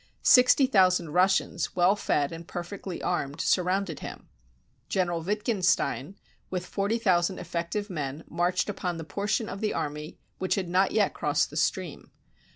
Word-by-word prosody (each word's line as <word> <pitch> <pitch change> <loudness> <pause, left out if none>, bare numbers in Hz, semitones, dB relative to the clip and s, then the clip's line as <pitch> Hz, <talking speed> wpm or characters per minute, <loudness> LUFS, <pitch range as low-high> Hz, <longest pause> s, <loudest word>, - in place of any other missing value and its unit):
Sixty 250 +2 +6
thousand 185 - +3
Russians, 180 -1 +1
well 180 +2 +4
fed 145 -8 0
and 165 0 -8
perfectly 180 +1 -6
armed, 145 -4 -2
surrounded 185 -1 +1
him. - - -9 0.6
General 175 -3 0
Wittgenstein, 190 - 0 0.3
with 180 -1 -3
forty 200 +5 -1
thousand 185 -4 +2
effective 175 +4 -3
men, 150 -5 -4
marched 180 +1 0
upon 185 -4 -3
the 165 - -5
portion 205 +6 -2
of 195 - -6
the 215 - -1
army 150 +1 -4 0.2
which 185 - 0
had 185 -3 -3
not 185 +2 +3
yet 215 -2 +2
crossed - - 0
the - - -10
stream. - - -2
180 Hz, 150 wpm, -27 LUFS, 170-200 Hz, 0.6 s, Sixty